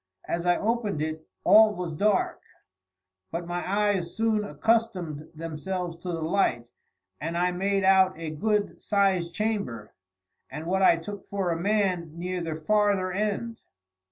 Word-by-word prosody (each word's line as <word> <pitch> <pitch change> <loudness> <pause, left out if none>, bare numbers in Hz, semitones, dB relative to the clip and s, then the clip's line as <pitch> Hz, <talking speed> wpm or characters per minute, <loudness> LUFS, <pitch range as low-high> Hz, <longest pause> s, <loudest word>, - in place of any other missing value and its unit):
As 170 +1 -2
I 175 - +4
opened 220 -5 -1
it 155 0 -5 0.2
all 215 -1 +7
was 175 -3 -4
dark; 200 +5 +1 0.9
but 170 +1 -4
my 175 +1 -3
eyes 200 -4 0
soon 220 -1 +2
accustomed 185 -9 -1
themselves 165 +2 -4
to 170 - -10
the 165 -2 -2
light, 160 -9 +1 0.5
and 165 +4 -3
I 180 +1 +2
made 195 +2 0
out 190 -2 +5
a 165 -1 -5
good 210 +6 -1
sized 190 -4 +1
chamber 200 - -2 0.6
and 150 +4 -7
what 190 +3 0
I 185 - +6
took 200 +4 -8
for 195 -3 -1
a - - 0
man 185 -5 0
near 180 +1 -3
the 165 -2 -3
farther 200 +2 +1
end. 215 +4 -2
185 Hz, 150 wpm, -27 LUFS, 165-205 Hz, 0.9 s, all